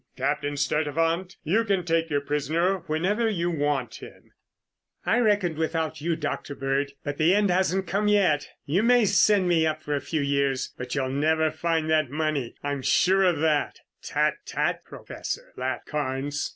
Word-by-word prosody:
Captain 145 +2 -1
Sturtevant, 165 +6 0
you 195 +9 +2
can 195 -5 0
take 165 -1 +1
your 145 -2 0
prisoner 160 +6 0
whenever 195 +9 +1
you 175 -4 -1
want 145 -7 -1
him." - - -13 0.7
"I 235 - +3
reckoned 205 -8 +2
without 160 -1 -2
you, 165 +1 0
Dr. 150 -2 -4
Bird, 135 +1 -1
but 145 -1 -4
the 165 +5 +4
end 205 -2 +2
hasn't 190 +1 +1
come 205 +3 0
yet. 190 -8 +3 0.2
You 160 +7 +1
may 240 0 +4
send 200 0 +4
me 165 -2 +3
up 155 0 -3
for 150 - -1
a 140 - -2
few 160 -3 -2
years, 140 -1 0
but 125 +1 -5
you'll 135 -2 -1
never 155 +3 +1
find 165 -2 -1
that 155 -4 +2
money. 150 -4 -2
I'm 145 -1 -2
sure 190 +8 +3
of 175 -5 +2
that." 155 -2 0 0.2
"Tut, - - +1
tut, - - -1
Professor," - - -7
laughed - - -3
Carnes. 145 -1 -2
160 Hz, 170 wpm, -26 LUFS, 145-185 Hz, 0.7 s, the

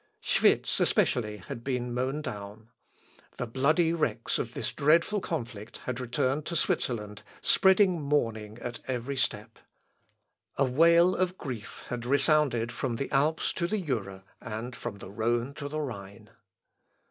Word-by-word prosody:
Schwitz, - - +2
especially, 105 -3 +2
had 115 +4 -8
been 125 -2 -2
mown 130 +5 -1
down. 105 +1 -7 0.7
The 125 - -2
bloody 155 +8 +2
wrecks 165 -2 0
of - - -4
this - - -2
dreadful 170 +8 +3
conflict 120 -11 -5
had 125 -1 -3
returned 130 +4 -1
to 170 - -3
Switzerland, 105 -8 -1 0.2
spreading 190 -3 +4
mourning 115 -7 -1
at 120 -1 -4
every 130 +1 -2
step. 130 - -2 1.0
A 140 - +4
wail 170 +7 +5
of 185 0 0
grief 120 -7 -7
had 120 -1 -3
resounded 135 -4 +3
from 125 -3 -2
the 135 +4 -4
Alps 150 +4 +2
to 170 - -1
the 215 +3 0
Jura, 105 - -3 0.2
and 115 +2 -5
from 120 -4 -6
the 95 - -10
Rhone 120 +5 0
to 140 0 -6
the 155 +2 -3
Rhine. 100 -8 -7
130 Hz, 145 wpm, -29 LUFS, 115-155 Hz, 1.0 s, wail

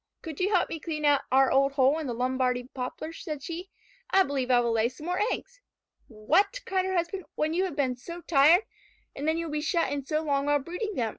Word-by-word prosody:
"Could 315 -4 -7
you 380 +3 +1
help 370 -4 +2
me 325 - -4
clean 305 -2 -4
out 290 -1 +4
our 265 0 +4
old 275 +1 +3
hole 275 +2 +3
in 310 - -4
the 240 - -3
Lombardy 250 0 0
poplar?" 265 +5 -5
said 305 -4 -6
she. 345 +4 -6 0.4
"I 385 0 +5
believe 275 -5 -2
I 245 -1 +5
will 235 -1 +1
lay 225 +1 +2
some 265 +5 -12
more 360 +2 -1
eggs." - - -6 0.5
"What?" 335 - +1
cried 380 -4 0
her 375 0 -1
husband. 345 +2 -2
"When 310 +1 0
you 370 +3 +1
have 355 -6 -5
been 265 -4 0
so 340 +8 -9
tired? 330 +5 +5 0.5
And 285 - -4
then 320 +1 +2
you 335 - -2
will 320 - -6
be 300 0 -1
shut 335 +2 0
in 285 -1 -2
so 305 +3 -1
long 280 -2 0
while 290 0 +4
brooding 360 +9 -5
them. 230 -2 0
300 Hz, 240 wpm, -28 LUFS, 265-345 Hz, 0.5 s, I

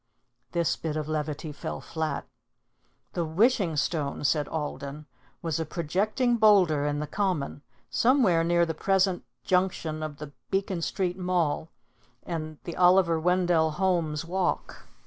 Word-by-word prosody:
This 170 -2 +1
bit 155 -1 -3
of 155 -1 -3
levity 155 0 -3
fell 145 - -5
flat. 160 -1 -3 0.9
"The 175 - 0
Wishing 185 +1 +2
Stone,[A]" 145 -1 -1
said 150 +1 +2
Alden, 150 -1 -5 0.4
"was 165 -1 -1
a - - 0
projecting 210 - 0
boulder 185 -10 +5
in 145 0 -1
the 150 - -2
Common, 165 -5 -2 0.3
somewhere 230 -10 +4
near 170 0 +3
the 165 - -2
present 190 +2 +1 0.2
junction 180 -4 0
of 155 -2 -5
the 150 -1 -8 0.2
Beacon 190 -2 -1
Street 180 +1 -1
mall 175 -4 0 0.5
and 155 -2 -5
the 170 - -6
Oliver 180 -2 +5
Wendell 175 -2 +2
Holmes 165 -4 0
walk. 180 +1 -2
170 Hz, 135 wpm, -27 LUFS, 155-185 Hz, 0.9 s, boulder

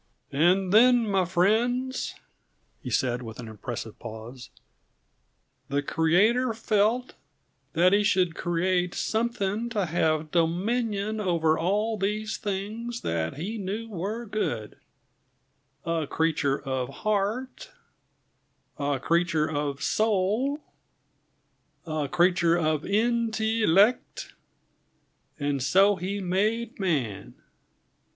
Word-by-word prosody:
"And 180 +6 +3
then, 240 +1 +6
my 195 -2 +2
friends," 235 +9 +1 0.7
he - - -6
said, 125 -1 0
with 110 -1 -9
an 120 - -7
impressive 110 0 -7
pause, 115 +3 -9 1.2
"the 140 +1 0
Creator 210 - +2
felt 225 +3 +1 0.6
that 180 +3 +4
He 205 +1 +4
should 185 -4 +2
create 180 +1 0
something 225 -1 -1
to 210 -5 -1
have 155 -2 0
dominion 205 +5 0
over 165 -5 +2
all 210 +7 0
these 210 +2 -2
things 215 +4 -4
that 80 0 -2
He 200 +10 -4
knew 210 +4 -4
were 210 +5 -4
good 120 - -3 1.1
a 165 -3 -1
creature 155 -4 0
of 130 -2 -3
heart, 215 - -2 1.1
a 140 -1 0
creature 165 0 +1
of 145 -2 -3
soul, 220 +7 +1 1.2
a 155 -3 -2
creature 175 0 +3
of 155 -3 0
in 230 +3 +1
till 220 -4 +1
ect, 245 - +2 1.1
and 145 -2 -1
so 195 +10 +4
He 190 +3 -3
made 210 +6 -1
man. 140 - -2
190 Hz, 105 wpm, -26 LUFS, 155-220 Hz, 1.2 s, then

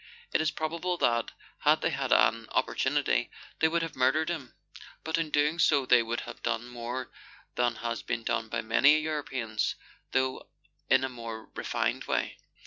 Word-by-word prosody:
It - - +3
is 155 - +2
probable 170 +3 -2
that, 115 -6 +2 0.3
had - - +3
they - - +1
had - - -2
mi 115 0 +4
opportunity, - - +1 0.3
they 160 - +5
would 165 +1 0
have 165 - -5
murdered 135 +6 +2
him; 155 -8 -5 0.5
but 160 +1 0
in 165 -2 -1
doing 150 +3 +2
so 145 -4 +5
would 130 - -10
they 120 -2 +6 0.2
have 120 - -9
done 120 0 -2
more 120 +1 -5 0.4
than 120 -1 +1
has 115 0 -3
been 115 -1 -3
done 115 0 -1
by - - -1
many 125 +7 +5
Europeans, 130 -9 -2 0.4
though 130 0 0 0.4
in 130 0 +5
a - - +1
more 115 -3 -8
refined - - -1
way - - -1
130 Hz, 170 wpm, -29 LUFS, 115-155 Hz, 0.5 s, they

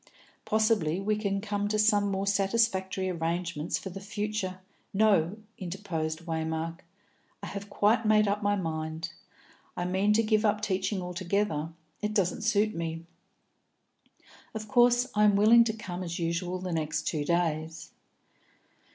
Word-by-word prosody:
Possibly 215 -7 +2
we 210 +2 0
can 200 -2 -1
come 205 -1 -2
to 215 +1 0
some 210 -1 +3
more 195 0 -1
satisfactory 195 -2 +1
arrangements 170 -2 -2
for 190 - -7
the 195 - -7
future 205 -2 -3 0.2
" - - -41
"No," 195 -2 +3 0.2
interposed 170 -4 -4
Waymark; 160 0 -3 0.6
"I - - -3
have 200 0 -6
quite 215 +3 +2
made 215 -1 +4
up 205 +1 0
my 205 0 +2
mind. 160 -2 -3 0.7
I 175 - -1
mean 190 +3 +2
to 225 +2 +3
give 215 0 +2
up 210 -1 +2
teaching 190 -1 -1
altogether; 180 -2 -1 0.3
it 210 0 -2
doesn't 190 -4 +1
suit 215 0 +2
me. 165 0 -4 1.5
Of 215 0 -5
course 245 +3 +4
I 210 - +3
am 205 -1 +5
willing 225 +4 +7
to 220 - 0
come 185 -5 -6
as 170 -2 -4
usual 175 +2 -2
the 185 0 -5
next 155 -1 -1
two 150 -3 -1
days." 160 -1 -1
195 Hz, 150 wpm, -29 LUFS, 170-210 Hz, 1.5 s, willing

